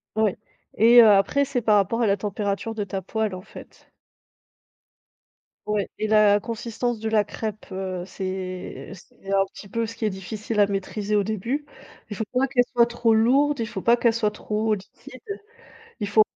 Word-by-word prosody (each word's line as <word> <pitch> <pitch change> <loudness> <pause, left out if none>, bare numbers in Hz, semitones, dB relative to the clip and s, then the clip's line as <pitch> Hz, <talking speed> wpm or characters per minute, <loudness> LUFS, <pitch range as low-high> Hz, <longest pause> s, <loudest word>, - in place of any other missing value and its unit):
Ouais 220 -3 +1 0.4
et 235 +2 +8
heu, 220 - +7
après 205 +8 +4
c'est 260 -2 -2
par 215 -2 +3
rapport 205 +4 +2
à 225 - +3
la 200 - +3
température 205 +2 -3
de 210 -2 -3
ta 190 0 -4
poêle, 215 0 -2
en 185 - -8
fait. - - -14 1.7
Ouais 210 -2 -1
et 215 - -2
la 210 -1 +5
consistance 230 +1 -3
de 220 0 -2
la 215 -2 +3
crêpe, 215 0 -6
heu, 185 -1 -4
c'est 185 -1 -6
c'est 195 +1 -12
un 195 0 +4
petit 200 - -11
peu 230 +3 -2
ce 230 - -8
qui 220 - -3
est 210 - +1
difficile 210 +3 -4
à 200 - +6
maîtriser, 200 +1 -2
au 205 - +3
début. 230 +8 -3 0.5
Il 205 - -3
faut 220 - -2
pas 255 +2 +3
qu'elle 245 -1 +3
soit 235 -1 +5
trop 235 -1 +1
lourde, 275 +5 +3
il 225 - 0
faut 190 - -6
pas 235 +1 +4
qu'elle 235 -1 +3
soit 220 -2 +1
trop 215 +1 -1
liquide, 255 +7 -13 0.8
il 205 - -2
faut 215 +1 +5
215 Hz, 190 wpm, -24 LUFS, 200-230 Hz, 1.7 s, et